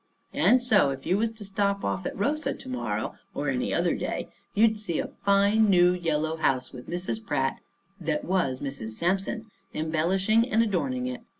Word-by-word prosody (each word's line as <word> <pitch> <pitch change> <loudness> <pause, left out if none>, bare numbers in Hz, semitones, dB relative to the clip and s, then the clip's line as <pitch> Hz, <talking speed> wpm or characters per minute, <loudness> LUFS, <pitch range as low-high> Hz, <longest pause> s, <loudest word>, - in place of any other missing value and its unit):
And 250 0 +4
so 215 - +4
if 135 0 -5
you 180 - +2
was 230 +1 +2
to 220 -2 -10
stop 200 0 0
off 95 -1 -1
at - - -6
Rosa 295 +10 0
to - - -12
morrow, 255 -1 -3 0.2
or - - -1
any - - -1
other - - +2
day, - - -3 0.3
you'd 220 0 +4
see 175 -7 -3
a - - -2
fine 200 +2 +4
new 180 -2 +6
yellow 160 -2 -1
house 135 -5 0
with 125 -1 -10
Mrs. 180 +6 -3
Pratt, 135 -10 -1 0.4
that 155 -3 -2
was 170 -9 0
Mrs. 135 -6 -5
Sampson, 195 - -1 0.2
embellishing 185 +9 +2
and 225 +1 +3
adorning 250 +5 -1
it. 255 -1 -4
190 Hz, 180 wpm, -27 LUFS, 160-220 Hz, 0.4 s, new